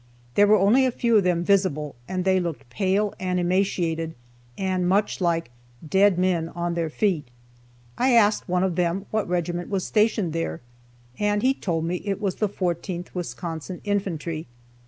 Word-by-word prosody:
There 205 +7 +5
were 215 +1 +6
only 210 +8 +4
a - - 0
few 235 -1 +2
of 205 - +4
them 175 -1 +2
visible, 175 -7 +1
and 185 -1 -2
they 190 0 +4
looked 155 -8 -5
pale 195 +7 +1
and 180 -1 -1
emaciated, 175 -3 0 0.4
and 185 -2 0
much 200 +1 +1
like 165 -6 0 0.4
"dead 195 +2 +4
men 180 -3 +1
on 175 0 -3
their 170 -1 -1
feet." 165 - 0 0.7
I 255 +1 +3
asked 215 -4 +3
one 180 0 +2
of 185 -3 0
them 180 +3 0
what 215 -4 -1
regiment 175 0 -2
was 195 -2 -1
stationed 210 -6 +1
there, 125 - -3 0.6
and 205 0 +1
he 260 +1 +4
told 165 -10 -2
me 175 +2 -1
it 200 -1 -2
was 200 -3 -2
the 210 - 0
14th 175 -1 -3
Wisconsin 170 +1 -5
Infantry. 170 -6 -2
180 Hz, 170 wpm, -24 LUFS, 170-200 Hz, 0.7 s, were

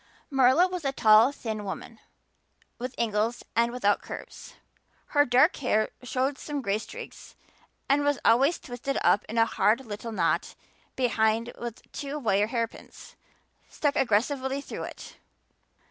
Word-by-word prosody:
Marilla 270 +6 +5
was 365 -2 -5
a 275 - 0
tall, 225 0 +6
thin 220 -6 -5
woman, 210 +3 -7 0.8
with 250 +1 -5
angles 225 +1 0
and 235 +1 +3
without 205 -5 +1
curves; - - -9 0.5
her 290 -1 +4
dark 260 +7 +4
hair 220 -5 +1
showed 260 +2 -1
some 290 -2 -4
gray 200 -1 0
streaks 470 - -10 0.5
and 285 +1 +3
was 290 -1 +2
always 270 +8 +4
twisted 255 +2 -4
up 200 - +4
in 225 - -4
a 225 - +5
hard 225 +3 +1
little 220 +1 -6
knot 220 - 0 0.4
behind 230 -2 +1
with 235 -2 -7
two 285 0 -5
wire 210 -6 +1
hairpins 230 -1 -5 0.5
stuck 290 -2 -1
aggressively 265 +4 +1
through 280 - -6
it. - - -10
245 Hz, 140 wpm, -27 LUFS, 220-275 Hz, 0.8 s, tall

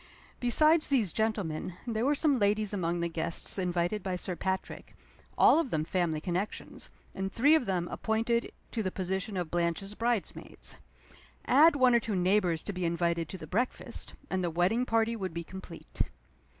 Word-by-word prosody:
Besides 305 +6 +4
these 235 - +2
gentlemen, 195 -7 -1
there 225 -2 -1
were 285 +3 +3
some 285 -3 +2
ladies 210 0 +1
among 175 -3 -1
the 170 - +1
guests 165 +3 -2
invited 180 +3 0
by 185 -1 -2
Sir 180 0 -3
Patrick 190 +1 -4 0.4
all - - +6
of 330 - -1
them 155 -6 0
family 165 -2 0
connections, 180 +6 -4 0.2
and 195 0 -3
three 285 +9 +4
of 315 -7 +3
them 180 -2 0
appointed 230 +3 -1 0.2
to 225 - -1
the 190 - -1
position 190 +2 -3
of 175 -3 -3
Blanche's 175 +3 -1
bridesmaids. 230 -1 -3 0.7
Add 300 +4 +6
one 255 -3 +5
or 235 - +6
two 220 -2 -3
neighbors 180 -2 +2
to 205 - -4
be 185 -1 -4
invited 170 0 0
to 190 - -6
the 160 - -8
breakfast 225 +11 -3
and 190 -1 -1
the 175 - 0
wedding 185 +9 +1
party 225 0 +2
would 190 -6 -5
be 170 - -3
complete. 185 -1 -8
190 Hz, 175 wpm, -30 LUFS, 175-230 Hz, 0.7 s, all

